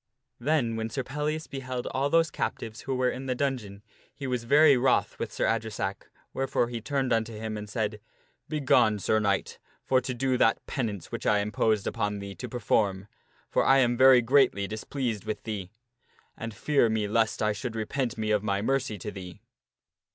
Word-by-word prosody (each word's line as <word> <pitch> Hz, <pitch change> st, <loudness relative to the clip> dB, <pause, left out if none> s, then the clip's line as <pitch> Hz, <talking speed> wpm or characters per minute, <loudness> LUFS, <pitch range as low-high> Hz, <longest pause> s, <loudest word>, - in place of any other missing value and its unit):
Then 120 Hz, -4 st, +1 dB
when 110 Hz, 0 st, -2 dB
Sir 130 Hz, +3 st, -3 dB
Pellias 150 Hz, +4 st, -3 dB
beheld 130 Hz, -2 st, -5 dB
all 135 Hz, +2 st, 0 dB
those 165 Hz, 0 st, +3 dB
captives 110 Hz, 0 st, -4 dB
who 135 Hz, -, -3 dB
were 125 Hz, 0 st, +1 dB
in 135 Hz, +1 st, -6 dB
the 130 Hz, -, 0 dB
dun 135 Hz, 0 st, 0 dB
geon 100 Hz, -2 st, -11 dB, 0.3 s
he 140 Hz, -, -6 dB
was 125 Hz, -3 st, -2 dB
very 145 Hz, +3 st, +6 dB
wroth 125 Hz, 0 st, +1 dB
with -, -, -3 dB
Sir -, -, -1 dB
Adresack, 110 Hz, -3 st, -2 dB, 0.2 s
wherefore 135 Hz, -3 st, 0 dB
he 120 Hz, -1 st, -5 dB
turned 135 Hz, -1 st, 0 dB
unto 115 Hz, 0 st, 0 dB
him 110 Hz, 0 st, -5 dB
and 105 Hz, 0 st, -6 dB
said, 105 Hz, -1 st, -2 dB, 0.2 s
" -, -, -42 dB
Begone, 130 Hz, -8 st, +3 dB
Sir 110 Hz, +2 st, +1 dB
Knight, 100 Hz, -2 st, -1 dB, 0.3 s
for 130 Hz, -1 st, +3 dB
to 125 Hz, 0 st, -4 dB
do 130 Hz, 0 st, 0 dB
that 115 Hz, -, +3 dB
penance 105 Hz, -, -4 dB
which -, -, -4 dB
I 105 Hz, -, +4 dB
imposed 105 Hz, 0 st, +1 dB
upon 105 Hz, 0 st, -1 dB
thee 100 Hz, 0 st, -7 dB
to 90 Hz, -, -7 dB
perform, 100 Hz, -4 st, 0 dB, 0.4 s
for -, -, +1 dB
I 135 Hz, -, +5 dB
am 120 Hz, -2 st, +3 dB
very 130 Hz, 0 st, +7 dB
greatly 120 Hz, -5 st, +3 dB
displeased 110 Hz, 0 st, -4 dB
with 110 Hz, 0 st, -4 dB
thee, 100 Hz, -5 st, -5 dB, 0.7 s
and 115 Hz, 0 st, -6 dB
fear 140 Hz, +1 st, +2 dB
me 110 Hz, -1 st, 0 dB
lest 110 Hz, 0 st, +1 dB
I 105 Hz, 0 st, +2 dB
should 115 Hz, +3 st, -5 dB
repent 120 Hz, +3 st, -2 dB
me 110 Hz, -1 st, -1 dB
of 105 Hz, -1 st, +3 dB
my 100 Hz, -1 st, 0 dB
mercy 130 Hz, -3 st, 0 dB
to 105 Hz, -, -6 dB
thee." 90 Hz, -3 st, -9 dB
115 Hz, 195 wpm, -28 LUFS, 105-130 Hz, 0.7 s, very